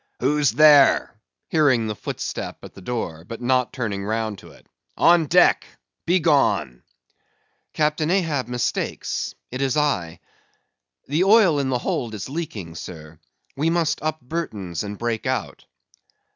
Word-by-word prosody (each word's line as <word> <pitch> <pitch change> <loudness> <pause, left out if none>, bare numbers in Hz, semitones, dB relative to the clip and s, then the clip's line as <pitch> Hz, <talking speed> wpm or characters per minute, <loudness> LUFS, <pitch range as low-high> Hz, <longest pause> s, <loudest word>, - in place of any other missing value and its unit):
"Who's 145 +2 +2
there?" 145 +2 +5 0.4
hearing 140 -8 +3
the 110 - -2
footstep - - -5
at - - -11
the 95 - -13
door, 90 -7 -4
but 115 +6 -8
not 125 0 +1
turning 105 -6 -3
round 110 -1 -2
to - - -14
it. - - -19 0.3
"On 170 -2 +4
deck! - - +4 0.4
Begone!" 155 - +2 0.9
"Captain 155 +1 0
Ahab 165 -9 0
mistakes; 125 -2 -3 0.2
it 130 +2 -4
is 135 0 0
I. 90 - 0 0.9
The 155 +6 +1
oil 195 -7 +5
in 135 -2 -1
the 125 - +1
hold 120 -2 -3
is 105 - -6
leaking, 125 - -5
sir. 80 -2 -10 0.4
We 150 +4 0
must 165 -2 0
up 155 0 -2
Burtons 110 - -4
and 105 0 -6
break 115 -1 -2
out." - - -3
130 Hz, 140 wpm, -22 LUFS, 105-155 Hz, 0.9 s, there